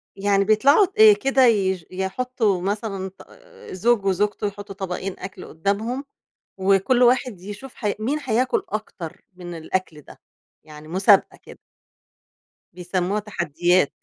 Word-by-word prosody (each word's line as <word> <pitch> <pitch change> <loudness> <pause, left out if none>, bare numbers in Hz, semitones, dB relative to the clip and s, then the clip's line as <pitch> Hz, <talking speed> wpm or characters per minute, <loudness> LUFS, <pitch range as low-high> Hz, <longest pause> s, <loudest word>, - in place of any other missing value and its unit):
يعني 200 0 +2
بيطلعوا 275 - +4 0.2
آآ - - +8
كده 270 -6 +3
يش 190 -6 +1
يحطوا 195 +1 -1
مثلًا 195 0 -3
ط - - -14 0.4
زوج 205 +2 +1
وزوجته 205 +2 0
يحطوا 205 0 -8
طبقين 190 0 -5
أكل 190 -1 -8
قدامهم 210 - -2 0.5
وكُل 195 +6 +3
واحد 245 -5 +2
يشوف 210 +7 -9
ح 210 -3 -1
مين 270 +8 -1
هياكل 260 - +1
أكتر 200 -6 -7
من 175 -1 -8
الأكل 165 -1 -4
ده، - - -16 0.4
يعني 150 0 -13
مسابقة 190 +4 +3
كده. - - -13 1.2
بيسموها 180 +3 -2
تحديّات. 175 -4 +1
200 Hz, 125 wpm, -22 LUFS, 185-225 Hz, 1.2 s, آآ